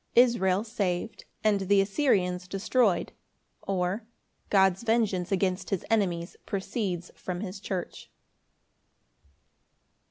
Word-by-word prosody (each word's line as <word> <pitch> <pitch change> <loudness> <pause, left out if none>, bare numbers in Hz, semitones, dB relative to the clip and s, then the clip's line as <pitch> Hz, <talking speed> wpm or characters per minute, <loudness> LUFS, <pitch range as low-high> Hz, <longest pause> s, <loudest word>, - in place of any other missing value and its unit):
Israel 215 -6 +4
saved, 200 -2 -3 0.2
and 210 -2 +3
the 195 +1 +3
Assyrians 195 -4 +1
destroyed; 200 0 +1 0.5
or, 190 +2 -1 0.5
God's 190 -2 +4
vengeance 220 -6 +1
against 185 -1 0
his 195 -4 -2
enemies 180 -6 0
proceeds 190 -3 -3
from 180 -1 -5
his 195 -1 -5
church. 190 -3 -5
195 Hz, 95 wpm, -28 LUFS, 180-215 Hz, 0.5 s, Israel